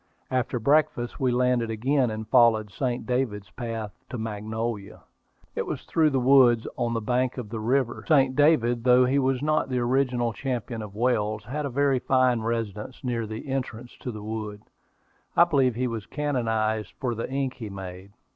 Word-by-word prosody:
After 130 Hz, -1 st, 0 dB
breakfast 135 Hz, -1 st, +1 dB
we 130 Hz, -2 st, +2 dB
landed 125 Hz, -1 st, +1 dB
again, 125 Hz, +4 st, +1 dB
and 110 Hz, 0 st, -5 dB
followed 110 Hz, -4 st, +4 dB
"St. 125 Hz, +2 st, -2 dB
David's 115 Hz, -7 st, -2 dB
Path" 115 Hz, -4 st, -5 dB, 0.2 s
to 125 Hz, -, -5 dB
Magnolia. 110 Hz, -1 st, -4 dB, 0.5 s
It -, -, -3 dB
was -, -, -4 dB
through 160 Hz, -2 st, +2 dB
the 135 Hz, -2 st, +1 dB
woods, 125 Hz, -3 st, +5 dB
on 120 Hz, -1 st, -1 dB
the 115 Hz, -, -1 dB
bank 125 Hz, +3 st, 0 dB
of 120 Hz, -5 st, -5 dB
the 115 Hz, 0 st, -4 dB
river. 120 Hz, +2 st, 0 dB
"St. 135 Hz, -4 st, +4 dB
David," 120 Hz, -6 st, +3 dB
though 125 Hz, 0 st, +6 dB
he 135 Hz, +3 st, +2 dB
was 135 Hz, 0 st, 0 dB
not 155 Hz, -2 st, +1 dB
the 130 Hz, -, -1 dB
original 125 Hz, -1 st, +1 dB
champion 120 Hz, -2 st, -3 dB
of 105 Hz, -2 st, -8 dB
Wales, 110 Hz, -3 st, 0 dB
had 140 Hz, +6 st, -3 dB
a -, -, -5 dB
very 135 Hz, 0 st, +2 dB
fine 130 Hz, -2 st, +2 dB
residence 115 Hz, +1 st, -4 dB
near 120 Hz, -3 st, -2 dB
the 110 Hz, +6 st, -7 dB
entrance 125 Hz, -3 st, -4 dB
to 125 Hz, -, -5 dB
the 105 Hz, -2 st, -8 dB
wood. 105 Hz, -1 st, -5 dB, 0.7 s
I -, -, +9 dB
believe 135 Hz, -8 st, +2 dB
he 125 Hz, +2 st, -1 dB
was 115 Hz, -4 st, -4 dB
canonized 110 Hz, -7 st, -1 dB
for 125 Hz, -3 st, -1 dB
the 115 Hz, -, -4 dB
ink 135 Hz, -1 st, -1 dB
he 110 Hz, -4 st, -6 dB
made. 95 Hz, 0 st, -8 dB
120 Hz, 180 wpm, -26 LUFS, 110-130 Hz, 0.7 s, I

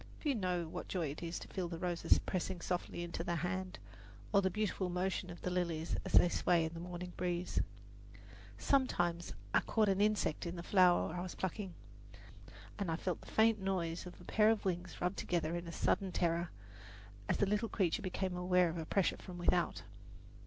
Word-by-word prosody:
Few 295 Hz, -3 st, 0 dB
know 180 Hz, -6 st, -1 dB
what -, -, -6 dB
joy 170 Hz, -6 st, -1 dB
it 150 Hz, -, -8 dB
is 170 Hz, 0 st, -3 dB
to -, -, -8 dB
feel 185 Hz, -3 st, -3 dB
the 170 Hz, -1 st, -5 dB
roses 175 Hz, 0 st, +2 dB
pressing 185 Hz, 0 st, -2 dB
softly 175 Hz, 0 st, -2 dB
into 170 Hz, -1 st, -4 dB
the 170 Hz, -, -1 dB
hand, 180 Hz, +3 st, -2 dB, 0.6 s
or 200 Hz, -, +6 dB
the 190 Hz, -, +2 dB
beautiful 200 Hz, -2 st, -1 dB
motion 180 Hz, 0 st, -1 dB
of 175 Hz, -, -9 dB
the 180 Hz, -, -1 dB
lilies 170 Hz, -3 st, -1 dB
as -, -, -6 dB
they -, -, +8 dB
sway 170 Hz, -1 st, +2 dB
in 160 Hz, -, -4 dB
the 165 Hz, -, -6 dB
morning 175 Hz, +1 st, -6 dB
breeze. 175 Hz, 0 st, 0 dB, 1.0 s
Sometimes 175 Hz, -, +1 dB, 0.2 s
I -, -, +6 dB
caught 215 Hz, -2 st, +2 dB
an 195 Hz, +1 st, +2 dB
insect 210 Hz, -6 st, +1 dB
in 170 Hz, -, -4 dB
the 170 Hz, -, -6 dB
flower 180 Hz, -4 st, +4 dB
I 175 Hz, -, -3 dB
was 180 Hz, 0 st, -5 dB
plucking, 190 Hz, 0 st, -3 dB, 1.0 s
and 200 Hz, -4 st, -1 dB
I 165 Hz, -, +1 dB
felt 175 Hz, 0 st, -2 dB
the -, -, -14 dB
faint 220 Hz, 0 st, +4 dB
noise 180 Hz, -3 st, -1 dB
of 180 Hz, -, -11 dB
a -, -, -12 dB
pair 215 Hz, +3 st, +4 dB
of 220 Hz, -2 st, +1 dB
wings 180 Hz, -1 st, -2 dB
rubbed 180 Hz, +2 st, -1 dB
together 170 Hz, -1 st, 0 dB
in 175 Hz, 0 st, -4 dB
a -, -, -5 dB
sudden 190 Hz, +3 st, +1 dB
terror, 170 Hz, 0 st, +1 dB, 0.8 s
as -, -, +2 dB
the -, -, +3 dB
little 210 Hz, +3 st, 0 dB
creature 180 Hz, -5 st, +1 dB
became 185 Hz, -1 st, -2 dB
aware 180 Hz, 0 st, +3 dB
of 165 Hz, +1 st, -4 dB
a 160 Hz, -, -5 dB
pressure 195 Hz, -3 st, +2 dB
from 180 Hz, -2 st, -9 dB
without. 175 Hz, -1 st, +1 dB
180 Hz, 200 wpm, -35 LUFS, 170-190 Hz, 1.0 s, they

